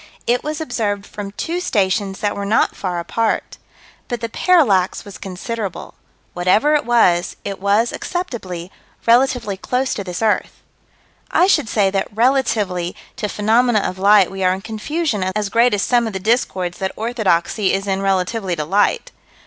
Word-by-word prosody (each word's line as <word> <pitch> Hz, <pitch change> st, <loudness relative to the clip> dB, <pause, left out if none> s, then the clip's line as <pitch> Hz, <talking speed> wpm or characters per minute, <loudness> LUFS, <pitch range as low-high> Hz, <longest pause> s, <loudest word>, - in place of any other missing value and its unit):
It 245 Hz, +1 st, +1 dB
was 305 Hz, 0 st, -3 dB
observed 210 Hz, -9 st, -2 dB
from 205 Hz, -1 st, -7 dB
two 335 Hz, +10 st, -3 dB
stations 195 Hz, -, 0 dB
that 205 Hz, -1 st, 0 dB
were 200 Hz, -, -4 dB
not 210 Hz, +3 st, +2 dB
far 180 Hz, -3 st, -3 dB
apart. 220 Hz, +6 st, -2 dB, 0.5 s
But 240 Hz, -2 st, -3 dB
the 230 Hz, -, -4 dB
parallax 225 Hz, -, +2 dB
was 200 Hz, -, -10 dB
considerable. 195 Hz, +1 st, -5 dB, 0.4 s
Whatever 185 Hz, +12 st, +3 dB
it 295 Hz, -5 st, +1 dB
was, 180 Hz, -8 st, +3 dB
it 200 Hz, -1 st, -4 dB
was, 205 Hz, +4 st, +2 dB
acceptably, 195 Hz, -, -5 dB, 0.3 s
relatively 240 Hz, -4 st, +2 dB
close 255 Hz, +6 st, -1 dB
to 200 Hz, -, -4 dB
this 180 Hz, +3 st, -5 dB
earth. 215 Hz, -2 st, 0 dB, 0.7 s
I -, -, +4 dB
should 375 Hz, -, +2 dB
say 200 Hz, -3 st, +2 dB
that 195 Hz, 0 st, -1 dB
relatively 215 Hz, -7 st, +1 dB, 0.2 s
to 210 Hz, -, -2 dB
phenomena 220 Hz, +2 st, +2 dB
of 185 Hz, -, -4 dB
light 200 Hz, -1 st, +5 dB
we 195 Hz, 0 st, -4 dB
are 185 Hz, 0 st, +3 dB
in 190 Hz, -, -8 dB
confusion 225 Hz, -, -2 dB
as 210 Hz, -1 st, -1 dB
great 235 Hz, +3 st, +4 dB
as 205 Hz, -2 st, 0 dB
some 240 Hz, -2 st, +2 dB
of 220 Hz, -, -5 dB
the 190 Hz, -, -3 dB
discords 190 Hz, -5 st, 0 dB
that 190 Hz, -1 st, -2 dB
orthodoxy 210 Hz, -4 st, 0 dB
is 195 Hz, +1 st, -1 dB
in 195 Hz, -1 st, -1 dB
relatively 195 Hz, 0 st, 0 dB
to 155 Hz, -2 st, -3 dB
light. 205 Hz, -, +1 dB
205 Hz, 165 wpm, -19 LUFS, 190-240 Hz, 0.7 s, light